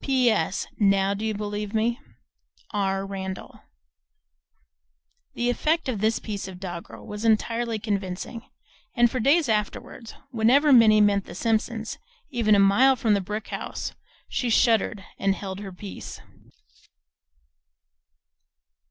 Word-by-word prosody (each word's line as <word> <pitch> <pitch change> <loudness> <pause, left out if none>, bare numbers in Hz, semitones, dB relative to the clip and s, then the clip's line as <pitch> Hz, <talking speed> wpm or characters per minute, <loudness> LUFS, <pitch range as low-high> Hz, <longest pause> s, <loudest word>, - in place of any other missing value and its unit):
P. 260 -3 +3
S. 185 -1 -1
Now 195 -1 +3
do 200 +2 -5
you 220 -1 -1
believe 210 +1 -4
me? 235 +3 +1 0.7
R. 195 -2 -1
Randall. 190 -1 -6 1.8
The 240 0 +1
effect 320 +5 0
of 230 -6 -2
this 220 +1 +2
piece 205 -3 -5
of 185 -1 -9
doggerel 175 -3 -8
was 210 +1 -7
entirely 230 +1 +1
convincing, 205 +1 -4 0.5
and 240 -1 +4
for 255 - -2
days 285 +6 +3
afterwards 220 +1 -3 0.2
whenever 265 +5 +4
Minnie 220 -3 +7
met 200 -1 +3
the 175 - -10
Simpsons 225 +1 -1 0.3
even 225 -5 +3
a - - +4
mile 205 +8 +5
from 230 -5 +1
the 200 - +2
brick 210 +3 -5
house - - -5 0.3
she 245 - -2
shuddered 225 -3 +2 0.2
and 195 0 +1
held 190 -1 -6
her 200 -2 -7
peace. 190 +2 -9
215 Hz, 130 wpm, -25 LUFS, 195-235 Hz, 1.8 s, Minnie